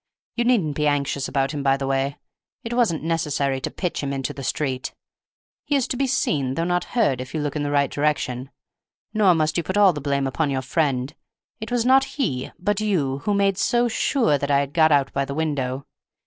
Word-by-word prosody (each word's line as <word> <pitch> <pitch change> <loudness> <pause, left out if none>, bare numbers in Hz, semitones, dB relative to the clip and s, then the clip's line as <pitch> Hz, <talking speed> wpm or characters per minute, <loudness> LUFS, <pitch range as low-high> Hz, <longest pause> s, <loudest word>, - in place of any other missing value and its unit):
You 235 - 0
needn't 195 - +2
be 150 0 +1
anxious 140 -1 0
about 135 -1 0
him, 145 -2 -4
by 135 -1 +2
the 135 - -3
way; 135 +1 -1 0.5
it 230 - -4
wasn't 225 -11 +1
necessary 145 -5 0
to - - -2
pitch 180 - -3
him 140 -1 -3
into 135 -1 -3
the 135 - -8
street; 130 0 -2 0.7
he 290 - 0
is 270 -3 +1
to - - -1
be 270 +2 0
seen 140 - 0
though 165 - 0
not 175 0 0
heard, 140 - +2
if 130 +5 -8
you - - 0
look 145 -1 -3
in 150 - -1
the 145 - -1
right 140 -1 +2
direction. 135 -3 -1 0.6
Nor 205 -5 +4
must 155 0 +1
you 170 - 0
put 190 +4 -2
all 200 -3 +6
the 145 - -5
blame 140 -1 0
upon 140 +3 -1
your 135 -1 -1
friend; 135 -1 0 0.5
it 220 - -6
was 245 -1 +1
not 265 +1 +5
he, 135 - -1
but 205 +2 0
you, 150 -11 0
who 205 - +1
made 200 -1 +2
so 240 0 +2
sure 225 - +1
that 140 - -3
I 140 -1 +4
had 140 0 -5
got 160 -2 +4
out 140 -2 +2
by 140 - +1
the 140 0 -5
window. 140 -4 -2
150 Hz, 225 wpm, -23 LUFS, 135-190 Hz, 0.7 s, all